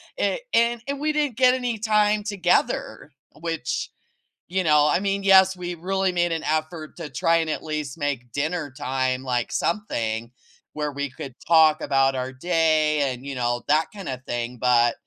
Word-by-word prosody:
it - - -1
and 235 +1 +3
and 280 0 -3
we 305 +1 0
didn't 295 -6 -1
get 255 0 +5
any 245 -3 -2
time 210 -1 +2
together, 185 -6 0 0.3
which, 165 -6 -3 0.6
you 185 +1 -1
know 150 -2 +4
I 150 - +2
mean, 195 0 -1
yes, 190 -1 +6
we 175 0 -4
really 190 +2 -1
made 175 -1 0
an 165 - -2
effort 155 +1 -3
to 165 -4 -6
try 165 +6 +2
and 160 -1 -1
at - - -3
least 150 -3 -4
make 140 -5 -3
dinner 150 +1 -2
time, 130 0 -1
like, 125 -2 -1
something 115 - -2 0.4
where 150 -1 -3
we 140 0 -3
could 135 -1 -9
talk 160 -2 +5
about 135 -1 +2
our 130 0 -3
day 155 -1 +1
and, 125 +2 -11
you 140 - -5
know, 120 -1 -1
that 155 +2 +3
kinda 135 -11 -6
thing, 120 +1 -3
but 120 -2 +4
155 Hz, 175 wpm, -24 LUFS, 135-190 Hz, 0.6 s, yes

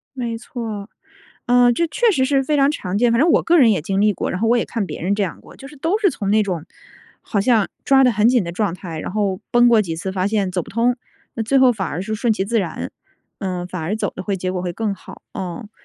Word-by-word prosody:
没 235 -3 -3
错。 225 -3 -6 0.6
呃， 245 -1 +5
这 335 +8 +1
确 480 +6 +2
实 260 -7 +2
是 270 0 +2
非 295 +3 0
常 275 0 +4
常 190 -10 -3
见。 240 +1 +3
反 235 - +2
正 330 +4 +4
我 - - +4
个 345 +1 +4
人 245 -6 +6
也 190 - 0
经 195 +4 -1
历 210 0 +4
过， - - -3
然 185 - -3
后 225 - +2
我 240 - +4
也 235 - +1
看 220 -4 -3
别 - - -7
人 190 +4 +1
这 205 - -1
样 190 - -4
过， - - -16
就 270 - -11
是 295 - -14
都 330 +9 0
是 405 -4 +3
从 200 -8 -3
那 215 +1 +4
种 180 -6 -3 0.6
好 205 - -1
像 220 -1 +3 0.2
抓 270 -1 +5
得 250 - +4
很 215 +1 +3
紧 245 -5 +3
的 170 - -5
状 200 -1 -1
态 170 -4 -7
然 - - -5
后 200 -3 -1
崩 240 0 +5
过 230 -3 +5
几 170 -5 -4
次 190 +3 -4
发 185 -1 0
现 205 -2 0
走 180 -1 -1
不 - - -12
通， 235 +3 +1 0.4
那 225 - -2
最 270 +5 +2
后 260 -1 +6
反 195 -5 -3
而 175 - -4
是 215 +3 -3
顺 230 +1 +1
其 195 -3 -1
自 230 +3 0
然， 170 -5 -4 0.5
呃， 180 -3 -3
反 180 -2 -6
而 185 +7 -2
走 - - -2
得 - - -6
会 195 0 -2
结 185 0 -3
果 180 -1 -3
会 180 -1 -3
更 210 +2 -2
好， 190 - -13
嗯。 190 +4 -6
215 Hz, 300 characters per minute, -20 LUFS, 190-245 Hz, 0.6 s, 人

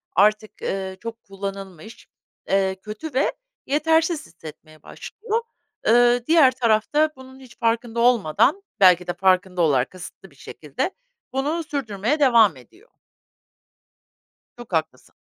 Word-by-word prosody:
artık, 215 +3 +2
ııı, 190 -1 -3
çok 230 0 -8
kullanılmış, 195 0 -8 0.4
eee, 190 -1 +1
kötü 215 +9 -8
ve 265 - +1 0.3
yetersiz 320 +3 +1
hissetmeye 155 -1 -14
başlıyor. 450 +1 -5 0.5
Iıı, 240 +1 +4
diğer 315 -5 +6
taraf 230 -3 0
da 305 +1 +3
bunun 260 0 -14
hiç 255 -2 -16
farkında 230 0 -1
olmadan, 240 - +2 0.2
belki 180 -2 +5
de 175 - -1
farkında 185 -1 +1
olarak 135 -6 +2
kasıtlı 185 0 -12
bir - - -22
şekilde 150 - -5 0.4
bunu 295 +5 -1
sürdürmeye 260 -2 -2
devam 230 - +5
ediyor. 365 - -20 1.7
Çok 240 -5 -12
haklısın. 155 -5 -3
225 Hz, 120 wpm, -22 LUFS, 190-270 Hz, 1.7 s, diğer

